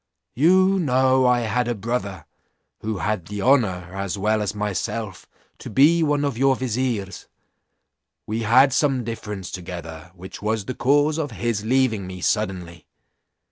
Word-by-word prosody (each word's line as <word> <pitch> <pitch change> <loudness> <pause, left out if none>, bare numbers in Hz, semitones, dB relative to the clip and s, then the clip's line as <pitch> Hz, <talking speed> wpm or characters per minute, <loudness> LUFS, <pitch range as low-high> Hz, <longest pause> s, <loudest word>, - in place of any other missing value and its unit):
You 185 +7 +4
know 130 -4 +3
I 125 -1 +3
had 120 +2 -1
a 120 - -1
brother, 105 -3 -4 0.5
who 110 -1 -3
had 105 -4 -2
the 105 -1 -5
honour, 95 -10 +2
as 100 0 -3
well 105 +2 +1
as 105 0 -3
myself, 105 0 -4 0.3
to - - -8
be 150 +9 +4
one 145 -2 +1
of 135 -5 -3
your 135 0 +4
viziers: 120 -6 -3 1.0
we 110 +2 -3
had 125 +4 +5
some 135 -3 +1
difference 105 -4 -6
together, 85 -2 -8
which 95 +1 -10
was 105 -1 -1
the 130 - -4
cause 145 +6 +2
of 150 -2 -2
his 115 -2 -2
leaving 115 -5 +1
me 90 0 -8
suddenly. 90 -5 -2
110 Hz, 150 wpm, -22 LUFS, 100-130 Hz, 1.0 s, had